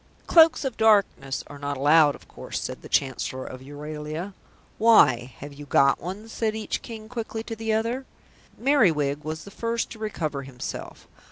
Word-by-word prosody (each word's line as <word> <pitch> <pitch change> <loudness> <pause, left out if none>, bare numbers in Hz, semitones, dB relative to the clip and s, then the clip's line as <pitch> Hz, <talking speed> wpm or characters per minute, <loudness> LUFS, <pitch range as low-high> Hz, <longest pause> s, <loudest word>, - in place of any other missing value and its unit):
"Cloaks 325 -3 +6
of 260 -4 -3
Darkness 200 -11 +2
are 145 - -11
not 145 -1 -3
allowed, 145 +1 +5
of - - -17
course," - - -6
said - - -6
the - - -11
Chancellor 130 -1 -1
of 130 - -8
Euralia. 150 +6 -6 0.5
"Why, 130 - +5
have 145 +1 -9
you 145 +1 -11
got 135 0 +4
one?" 195 +5 -6
said 225 -1 -2
each 220 -1 -3
King 220 -2 -9
quickly 225 -1 -5
to 225 - -6
the 225 0 -2
other. 235 +4 -1 0.5
Merriwig 160 - +2
was 155 +1 -5
the 200 - -11
first 230 +2 -2
to 225 - -9
recover 160 -10 -3
himself. 130 -2 -8
170 Hz, 170 wpm, -25 LUFS, 145-225 Hz, 0.5 s, Cloaks